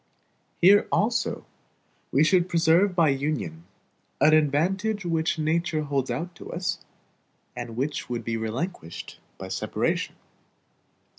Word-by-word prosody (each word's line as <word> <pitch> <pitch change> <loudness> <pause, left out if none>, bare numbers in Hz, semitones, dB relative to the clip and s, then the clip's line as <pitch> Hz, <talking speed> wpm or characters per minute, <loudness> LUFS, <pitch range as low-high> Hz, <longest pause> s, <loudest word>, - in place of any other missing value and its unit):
Here 200 +3 +6
also 230 +3 0 0.7
we 145 - +4
should 180 +2 +3
preserve 170 +3 +3
by 165 -4 +4
Union, 135 - -2 0.5
an 155 +1 +5
advantage 180 +8 +1
which 165 -1 0
nature 160 0 0
holds 140 -3 -1
out 175 +2 -3
to - - -9
us, 180 +1 -3 0.7
and 115 - -6
which 140 +1 -2
would 120 -1 -3
be 115 - -1
relinquished 115 - -5 0.2
by - - -7
separation. - - -1
160 Hz, 120 wpm, -26 LUFS, 140-180 Hz, 0.7 s, Here